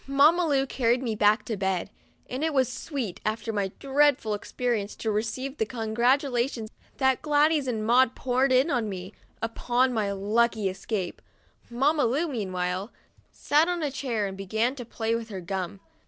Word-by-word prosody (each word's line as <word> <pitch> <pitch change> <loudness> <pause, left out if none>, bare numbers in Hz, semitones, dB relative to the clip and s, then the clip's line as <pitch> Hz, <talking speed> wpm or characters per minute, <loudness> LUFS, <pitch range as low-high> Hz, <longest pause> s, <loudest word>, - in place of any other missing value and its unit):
Mamma 305 +6 +4
Lu 275 -2 +2
carried 250 -1 +1
me 230 -3 -1
back 210 +1 +3
to 225 - -2
bed, 190 0 -1 0.4
and 255 +4 -4
it 320 -2 0
was 260 -2 +4
sweet, 230 - -4
after 220 +1 -2
my 200 -2 -1
dreadful 275 -5 +2
experience, 215 0 -2
to 220 - -2
receive 235 +6 -2
the 220 - +2
con 225 -3 -4
gratulations 245 -2 +1 0.3
that 265 -2 +2
Gladys 300 -1 +3
and 220 -3 -2
Maud 250 +2 +4
poured 260 +1 +1
in 260 +5 +4
on 235 -5 0
me, 185 +1 -6 0.3
upon 245 +3 +1
my 210 -3 0
lucky 215 +2 +1
escape. 190 -1 -4 0.5
Mamma 275 +4 +2
Lu, 280 +9 +1
meanwhile, 185 - -3 0.4
sat 305 +3 +2
on 350 -2 -1
a 290 - -1
chair, 240 -6 -2
and 195 -1 -4
began 220 +6 0
to 255 -4 -8
play 225 0 -2
with 230 0 -3
her 195 -3 -5
gum. 185 +1 -4
235 Hz, 170 wpm, -27 LUFS, 210-270 Hz, 0.5 s, Mamma